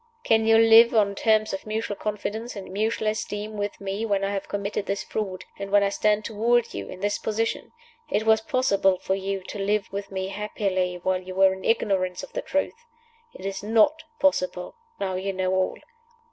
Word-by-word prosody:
"Can 225 0 +3
you 225 0 +6
live 225 +1 +7
on 205 -2 +3
terms 215 +1 +2
of 195 - -5
mutual 215 -1 -2
confidence 215 +3 -4
and 195 -2 -8
mutual 215 +2 -1
esteem 215 0 -3
with 205 0 -3
me 200 +2 -3
when 200 -3 0
I 195 - 0
have 195 -1 -3
committed 200 0 -3
this 200 - -2
fraud, 190 -4 -4
and 200 0 -5
when 205 0 +4
I 200 - +2
stand 210 +1 +1
toward 235 +2 +1
you 100 -1 -6
in 185 - -9
this 205 0 0
position? 225 +1 -2 0.4
It 220 - 0
was 220 0 +4
possible 200 -6 +2
for 190 - -2
you 195 0 -3
to 200 - -7
live 200 0 -1
with 200 0 -4
me 190 0 -3
happily 195 -3 -1
while 185 0 +1
you 185 0 -8
were 190 0 +5
in 190 0 -9
ignorance 190 -5 0
of - - -10
the - - -2
truth. 375 +11 -2 0.5
It - - -9
is 195 0 -3
not 225 +9 +3 0.2
possible, 185 -10 +1 0.3
now 190 -1 -2
you 190 +1 -2
know 185 0 0
all. 185 0 0
205 Hz, 200 wpm, -25 LUFS, 195-220 Hz, 0.5 s, live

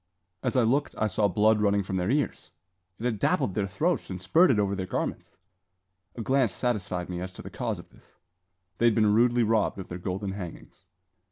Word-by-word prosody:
As - - -1
I 125 - +4
looked, 135 +6 +1
I 110 - +1
saw 105 0 +1
blood 105 +3 +3
running 100 -1 +2
from 95 0 -3
their 90 +2 -1
ears! 145 +3 -1 0.5
It - - -10
had 115 -4 -1
dappled 95 - +1
their 100 0 -1
throats 160 - -1
and 95 -1 -5
spurted 130 - +4
over 100 -1 +1
their 95 -2 -3
garments. - - -4 0.8
A 115 - -5
glance 130 -5 +2
satisfied 100 -7 -2
me 90 -1 -5
as 95 +1 -5
to - - -10
the - - -9
cause - - -3
of - - -13
this. - - -23 0.7
They 120 - +3
had 115 -2 +4
been 105 -2 +4
rudely 120 +2 +4
robbed 110 -2 +1
of 95 - -7
their 90 - -6
golden 95 +2 -3
hangings. 95 -4 -9
105 Hz, 205 wpm, -27 LUFS, 95-120 Hz, 0.8 s, I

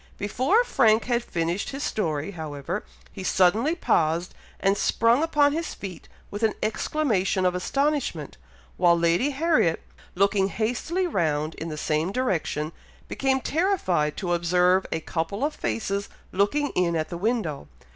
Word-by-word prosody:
Before 260 - +2
Frank 225 - +3
had 240 -1 0
finished 170 +1 -2
his 275 +1 -5
story, 160 -4 -2
however, 160 +2 -5 0.3
he 195 - -8
suddenly 210 - +3
paused, 170 - +1 0.3
and 195 0 +2
sprung 230 +5 +2
upon 295 -3 +3
his 330 +1 -3
feet 190 -3 -8 0.2
with 205 - -5
an 220 -2 +2
exclamation 215 -5 0
of 180 - +3
astonishment, 280 +9 -1 0.4
while 175 -1 +4
Lady 170 +11 +2
Harriet, 290 - +1 0.3
looking 195 +1 +3
hastily 245 - -1
round 155 - 0
in 165 - -6
the 155 - -5
same 155 +4 0
direction, 170 - -1 0.4
became 265 -1 0
terrified 265 - 0
to 175 -3 -1
observe 180 +2 +2
a 160 - -1
couple 175 - -2
of 305 - -2
faces 195 - -2 0.2
looking 280 +10 +1
in 175 -2 0
at 155 -1 -1
the 175 - -5
window. 185 - -1
195 Hz, 145 wpm, -25 LUFS, 170-260 Hz, 0.4 s, while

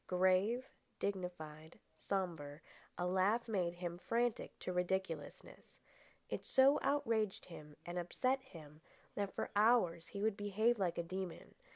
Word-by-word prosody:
Grave, 190 +7 +3 0.3
dignified, 170 -5 -4 0.2
sombre, 160 -5 -3 0.4
a 175 - 0
laugh 190 +6 +2
made 180 -6 0
him 175 -1 -4
frantic 235 +3 0
to 180 - -4
ridiculousness. 180 -3 -3 0.5
It - - -4
so 270 +2 +5
outraged 225 -8 +1
him 150 -4 -11
and 175 +1 -3
upset 255 +10 0
him 155 - -13 0.3
that 200 -1 -3
for - - -2
hours 205 -7 +4
he 200 0 -5
would 220 -2 +2
behave 215 +3 +2
like 175 -3 0
a 170 - 0
demon. 185 +1 -5
185 Hz, 135 wpm, -37 LUFS, 170-220 Hz, 0.5 s, so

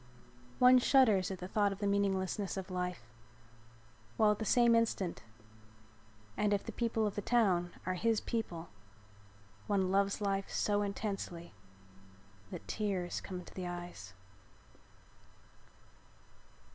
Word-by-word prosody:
One 250 0 +7
shudders 240 -8 +4
at 190 - -4
the 180 - -7
thought 205 +1 +1
of 195 - -5
the 205 - -3
meaninglessness 200 -1 0
of 190 0 -5
life 180 -10 -4 1.0
while 215 -1 +5
at 210 - -2
the 220 - -2
same 235 +2 +5
instant, 225 -6 0 1.1
and 210 -1 +1
if 200 - -3
the 230 - -6
people 225 -1 0
of 205 - -1
the 205 - -3
town 190 -7 +2
are 185 - 0
his 220 +4 +1
people, 175 -8 -4 1.0
one 190 -3 +1
loves 200 0 +2
life 195 -1 -1
so 205 0 +1
intensely 200 - -4 1.0
that - - -8
tears 195 -5 -2
come 185 - -6
into - - -13
the 185 -1 -5
eyes. 175 - -7
200 Hz, 130 wpm, -33 LUFS, 180-215 Hz, 1.1 s, One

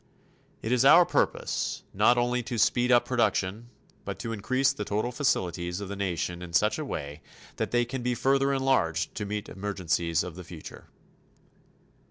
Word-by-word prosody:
It 110 - -2
is 125 0 +3
our 165 +6 +8
purpose - - -1
not 120 - +4
only 120 +1 +1
to 120 0 -5
speed 120 +3 +3
up 120 -1 +5
production 115 -2 0 0.3
but - - -5
to 115 - -4
increase 130 +6 +1
the 105 - -4
total 110 +4 -1
facilities 90 - -1
of 100 -2 -6
the 100 - -4
nation 90 -2 -2
in 90 -1 -9
such 105 - +2
a 155 - -3
way 75 - -6 0.4
that - - -1
they 120 0 +2
can 125 +2 -5
be 125 0 -1
further 135 +3 +2
enlarged 130 -12 +1
to 105 -2 -4
meet 105 0 -4
emergencies 85 -4 -1
of 90 -2 -7
the 90 - -8
future. 85 -2 -11
110 Hz, 175 wpm, -27 LUFS, 90-125 Hz, 0.4 s, our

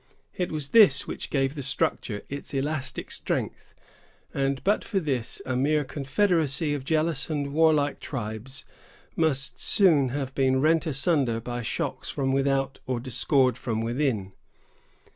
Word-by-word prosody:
It 180 -1 -2
was 150 -3 -3
this 205 -12 +6
which - - -6
gave 135 -1 0
the 150 - -6
structure 125 -5 -2
its 140 0 -6
elastic 140 0 -2
strength; - - -4 0.6
and 135 0 0
but 205 +2 +2
for 200 - -1
this, 130 -8 -2
a 130 - -2
mere 150 +4 +2
confederacy 150 +1 +1
of 145 -3 -3
jealous 155 0 0
and 145 -2 -2
warlike 155 -2 +3
tribes 120 +1 -5 0.5
must 140 -5 0
soon 155 -10 +4
have 135 0 -4
been 130 -1 +2
rent 160 +3 +2
asunder 140 -5 +1
by 120 +1 -5
shocks 110 - -3
from 135 -2 -1
without 135 0 0
or 130 -2 -1
discord 130 +1 +1
from 115 -3 -2
within. 115 -5 -1
135 Hz, 145 wpm, -26 LUFS, 130-155 Hz, 0.6 s, this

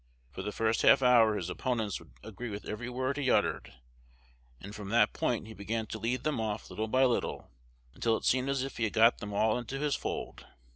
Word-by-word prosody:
For - - -6
the 105 - -4
first 110 +1 0
half - - +6
hour 115 -4 +5
his 90 -4 -3
opponents 110 +1 -2
would 85 - -16
agree 110 +3 -7
with 105 0 -6
every 115 +3 -5
word 130 +2 -2
he 140 -3 0
uttered; - - +1 0.9
and 100 +2 -9
from 105 -2 -7
that 115 -1 +3
point 115 -3 -1
he 110 - -9
began 110 +2 -3
to 110 - -6
lead 120 +4 -2
them 150 -7 -1
off 105 -3 -4
little 110 +4 -3
by 130 +4 +3
little, 125 -2 -1 0.4
until 115 - +1
it - - -8
seemed 130 +1 +2
as 135 -1 0
if 135 - -6
he 115 - +1
had 105 - -3
got 115 +2 +5
them 105 -1 -6
all 110 +3 +2
into 125 +3 -5
his 145 0 0
fold. - - -5
115 Hz, 225 wpm, -30 LUFS, 105-125 Hz, 0.9 s, half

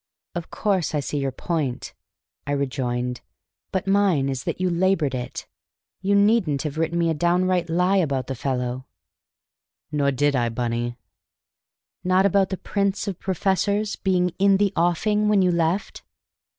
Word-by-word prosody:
"Of 175 -2 -5
course 190 -7 0
I - - +2
see 145 +1 -3
your 135 -1 -1
point," 140 -2 -3 0.5
I 145 - 0
rejoined; 125 -3 -2 0.5
"but 190 - -1
mine 195 -8 +2
is 130 -2 -4
that - - -3
you 185 - +1
labored 175 -5 +1
it. 125 -1 -5 0.6
You 200 +1 +2
needn't 200 -9 +3
have 155 0 -4
written 165 +1 0
me 170 -1 +2
a - - +1
downright 175 +2 +1
lie 180 +4 +2
about 140 -8 0
the 135 - -4
fellow." 125 0 -3 1.0
"Nor 145 -2 +1
did 145 +2 +1
I, 120 -2 +1
Bunny." 120 0 -2 1.1
"Not 185 +1 +3
about 195 -1 +3
the 190 - -3
'prince 200 +2 -1
of 190 -3 -4
professors' 200 +3 0
being 180 -2 +1
'in 195 0 +5
the 200 -1 +1
offing' 210 +5 +2
when 205 -2 +4
you 180 - +3
left?" 170 +3 -1
170 Hz, 155 wpm, -23 LUFS, 140-195 Hz, 1.1 s, in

